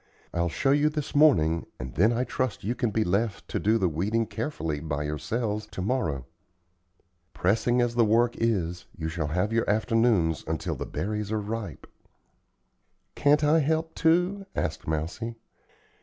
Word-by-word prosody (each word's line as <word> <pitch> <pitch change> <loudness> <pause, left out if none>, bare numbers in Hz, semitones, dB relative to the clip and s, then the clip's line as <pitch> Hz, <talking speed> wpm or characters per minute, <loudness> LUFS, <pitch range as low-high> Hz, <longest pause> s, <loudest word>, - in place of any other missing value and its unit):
I'll 85 0 0
show 135 +10 +1
you 145 +2 +4
this 150 -2 -4
morning 85 - +4
and 65 0 -6
then 105 +7 +4
I 120 +1 +1
trust 130 -1 -2
you 110 +5 0
can 125 -2 -1
be 110 +1 +1
left 100 +2 -1
to - - -1
do 110 +2 +3
the 95 - +2
weeding 100 +8 0
carefully 105 - -3
by 75 -1 -3
yourselves 105 - -2
to - - -6
morrow. 80 - -1 1.1
Pressing 115 +6 +2
as 120 -1 -1
the 120 0 +4
work 115 +2 +3
is, 90 -7 -1
you 80 -1 -3
shall 80 -2 -2
have 90 +8 0
your 115 -2 +1
afternoons 110 -6 +2
until 80 -1 -2
the - - -5
berries 105 +1 -3
are 110 - 0
ripe." 105 0 -5 1.3
"Can't 145 +1 +3
I 150 +2 +5
help, 160 +2 0
too?" 180 +4 +2
asked 80 - -3
Mousie. 85 +10 -3
110 Hz, 160 wpm, -27 LUFS, 85-120 Hz, 1.3 s, I